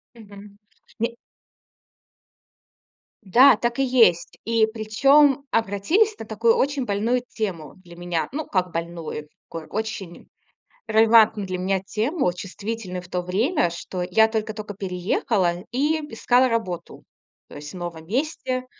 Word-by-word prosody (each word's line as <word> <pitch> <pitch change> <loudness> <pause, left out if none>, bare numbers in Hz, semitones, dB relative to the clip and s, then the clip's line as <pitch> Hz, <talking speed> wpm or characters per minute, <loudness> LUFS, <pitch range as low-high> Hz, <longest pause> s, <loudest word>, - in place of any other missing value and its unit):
Мгм. 205 -2 -14 0.4
Не 230 +2 0 2.1
Да, 240 +5 +6
так 235 +2 -2
и - - +3
есть. 225 -10 +3
И 225 0 +3
причём 270 +6 +3
обратились 230 - +1
на - - -7
такую 225 +1 +2
очень 280 0 0
больную 225 +5 0
тему 175 - -5
для 170 -1 -14
меня. 175 -2 -2
Ну, 305 +2 -4
как 180 -2 -1
больную, 165 -2 -5 0.2
очень 190 +2 -6 0.6
релевантную 220 -2 +5
для 185 -1 -4
меня 190 +1 0
тему, 220 - -1
чувствительную 195 0 -6
в 180 - -15
то 180 - -2
время, 195 - 0
что 180 +2 -6
я 220 +5 +4
только-только 215 -2 -4
переехала 185 0 0 0.2
и 295 +6 +1
искала 250 +3 +3
работу, 220 -7 -4 0.4
то - - -12
есть 145 0 -8
в - - -8
новом 170 -2 -7
месте. 255 - -2
215 Hz, 130 wpm, -23 LUFS, 180-235 Hz, 2.1 s, Да